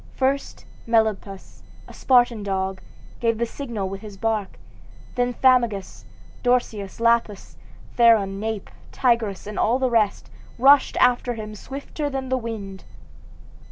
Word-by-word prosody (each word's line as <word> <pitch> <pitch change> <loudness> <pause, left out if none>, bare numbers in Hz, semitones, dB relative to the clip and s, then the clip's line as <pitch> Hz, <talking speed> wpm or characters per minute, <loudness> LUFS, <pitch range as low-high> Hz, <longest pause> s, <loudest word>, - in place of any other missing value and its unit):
First 270 +1 -1 0.2
Melampus, 215 -4 -1 0.3
a - - -12
Spartan 245 -4 +3
dog, 190 -1 -2 0.4
gave 230 -1 +1
the 235 - 0
signal 230 -5 -5
with 195 +1 -7
his 210 -2 -10
bark, 215 -2 -2 0.6
then 245 -1 -1
Pamphagus, 235 -7 +1 0.4
Dorceus, 230 -6 -1
Lelaps, 230 -3 +1 0.4
Theron, 215 -5 +4
Nape, 220 -1 -4 0.2
Tigris, 235 -6 0
and 210 0 -5
all 235 +3 +2
the 260 -2 0
rest, 215 -4 0 0.3
rushed 275 +3 +5
after 245 -1 +2
him 215 -1 -7
swifter 280 +6 -6
than 265 -1 -4
the 260 - +1
wind. 205 -5 -7
230 Hz, 125 wpm, -23 LUFS, 200-245 Hz, 0.6 s, rushed